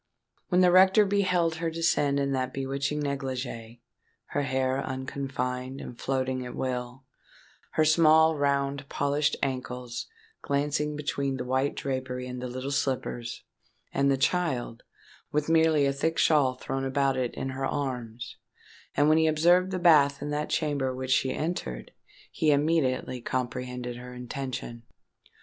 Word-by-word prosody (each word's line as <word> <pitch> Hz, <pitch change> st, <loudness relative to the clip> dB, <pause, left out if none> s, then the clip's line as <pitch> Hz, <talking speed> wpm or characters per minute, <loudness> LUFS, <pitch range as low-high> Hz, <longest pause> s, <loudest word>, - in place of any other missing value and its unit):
When 180 Hz, -1 st, +4 dB
the 180 Hz, -1 st, +6 dB
rector 190 Hz, +3 st, +6 dB
beheld 180 Hz, -5 st, +1 dB
her 165 Hz, 0 st, -1 dB
descend 160 Hz, -4 st, +1 dB
in 140 Hz, 0 st, 0 dB
that 130 Hz, -1 st, -1 dB
bewitching 135 Hz, +2 st, -2 dB
negligee,—her 130 Hz, -2 st, -5 dB
hair 130 Hz, 0 st, 0 dB
unconfined, 130 Hz, 0 st, -4 dB
and 120 Hz, -, -8 dB
floating 130 Hz, -1 st, -1 dB
at 125 Hz, -, -7 dB
will—her 130 Hz, +4 st, -5 dB
small, 160 Hz, 0 st, +5 dB
round, 140 Hz, -1 st, 0 dB
polished 145 Hz, +1 st, +1 dB
ankles 125 Hz, -2 st, -3 dB, 0.3 s
glancing 150 Hz, +1 st, -1 dB
between 140 Hz, -2 st, -2 dB
the 125 Hz, -, -3 dB
white 130 Hz, +2 st, 0 dB
drapery 130 Hz, -2 st, -3 dB
and 125 Hz, 0 st, -6 dB
the 125 Hz, -, -3 dB
little 130 Hz, +2 st, -5 dB
slippers,—and 135 Hz, +1 st, -3 dB
the 135 Hz, -, +3 dB
child, 135 Hz, -6 st, 0 dB, 0.5 s
with 150 Hz, +1 st, 0 dB
merely 160 Hz, -3 st, +4 dB
a 140 Hz, -, +1 dB
thick 160 Hz, +4 st, -1 dB
shawl 140 Hz, -5 st, +3 dB
thrown 135 Hz, +1 st, -4 dB
about 135 Hz, 0 st, +1 dB
it, 125 Hz, -2 st, -2 dB
in 135 Hz, -, -3 dB
her 135 Hz, 0 st, -2 dB
arms,—and 125 Hz, +2 st, -4 dB
when 155 Hz, +1 st, +5 dB
he 160 Hz, -, +3 dB
observed 175 Hz, +4 st, +4 dB
the 185 Hz, -, -2 dB
bath 150 Hz, -5 st, +5 dB
in 145 Hz, -, -4 dB
that 150 Hz, +1 st, -2 dB
chamber 140 Hz, -4 st, 0 dB
which 130 Hz, 0 st, -4 dB
she 130 Hz, 0 st, +3 dB
entered, 150 Hz, -, -4 dB, 0.4 s
he 155 Hz, -, +1 dB
immediately 145 Hz, -4 st, +1 dB
comprehended 125 Hz, 0 st, -3 dB
her 125 Hz, 0 st, -9 dB
intention. 125 Hz, -1 st, -5 dB
135 Hz, 135 wpm, -28 LUFS, 130-150 Hz, 0.5 s, the